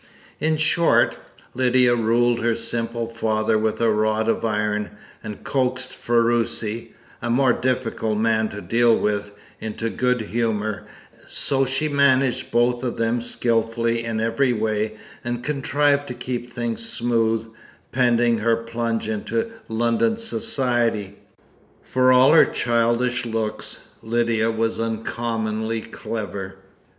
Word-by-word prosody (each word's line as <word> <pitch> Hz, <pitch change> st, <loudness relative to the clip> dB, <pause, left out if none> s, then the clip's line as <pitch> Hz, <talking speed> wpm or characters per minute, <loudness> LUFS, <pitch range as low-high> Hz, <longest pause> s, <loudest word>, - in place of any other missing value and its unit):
In 155 Hz, 0 st, +1 dB
short, 160 Hz, +2 st, +3 dB, 0.4 s
Lydia 125 Hz, -1 st, +3 dB
ruled 120 Hz, +1 st, +2 dB
her 115 Hz, 0 st, +1 dB
simple 115 Hz, 0 st, -3 dB
father 110 Hz, -1 st, 0 dB
with 110 Hz, 0 st, 0 dB
a 115 Hz, -1 st, +3 dB
rod 110 Hz, +1 st, +1 dB
of 115 Hz, -, 0 dB
iron, 105 Hz, -1 st, -1 dB, 0.3 s
and 105 Hz, -3 st, -7 dB
coaxed 130 Hz, -1 st, -1 dB
Ferruci 115 Hz, -1 st, 0 dB, 0.3 s
a 120 Hz, -, -3 dB
more 125 Hz, +1 st, +3 dB
difficult 115 Hz, -4 st, -1 dB
man 110 Hz, 0 st, +1 dB
to 105 Hz, -, -7 dB
deal 115 Hz, +1 st, +3 dB
with 105 Hz, -1 st, -1 dB, 0.3 s
into 110 Hz, +1 st, -4 dB
good 125 Hz, -1 st, 0 dB
humour; 110 Hz, -3 st, -2 dB, 0.4 s
so 135 Hz, -1 st, +1 dB
she 135 Hz, +4 st, -1 dB
managed 135 Hz, -3 st, +2 dB
both 120 Hz, +1 st, +1 dB
of 125 Hz, -, -2 dB
them 115 Hz, +1 st, 0 dB
skilfully 115 Hz, 0 st, 0 dB
in 115 Hz, -1 st, -2 dB
every 115 Hz, +4 st, +1 dB
way, 110 Hz, -1 st, -1 dB, 0.3 s
and 120 Hz, 0 st, -3 dB
contrived 145 Hz, 0 st, +1 dB
to 125 Hz, -, -6 dB
keep 120 Hz, 0 st, -4 dB
things 120 Hz, -, -3 dB
smooth, 115 Hz, -, 0 dB, 0.5 s
pending 120 Hz, -2 st, +3 dB
her 115 Hz, +1 st, +2 dB
plunge 115 Hz, -1 st, -3 dB
into 225 Hz, -, -2 dB, 0.2 s
London 120 Hz, -, +1 dB
society. 120 Hz, -, 0 dB, 0.7 s
For 130 Hz, 0 st, +3 dB
all 130 Hz, +3 st, +6 dB
her 165 Hz, -, +8 dB
childish 120 Hz, +1 st, 0 dB
looks, 110 Hz, -1 st, -4 dB
Lydia 115 Hz, -1 st, +1 dB
was 115 Hz, 0 st, -1 dB
uncommonly 115 Hz, 0 st, -2 dB
clever. 100 Hz, -4 st, -6 dB
115 Hz, 125 wpm, -22 LUFS, 110-125 Hz, 0.7 s, her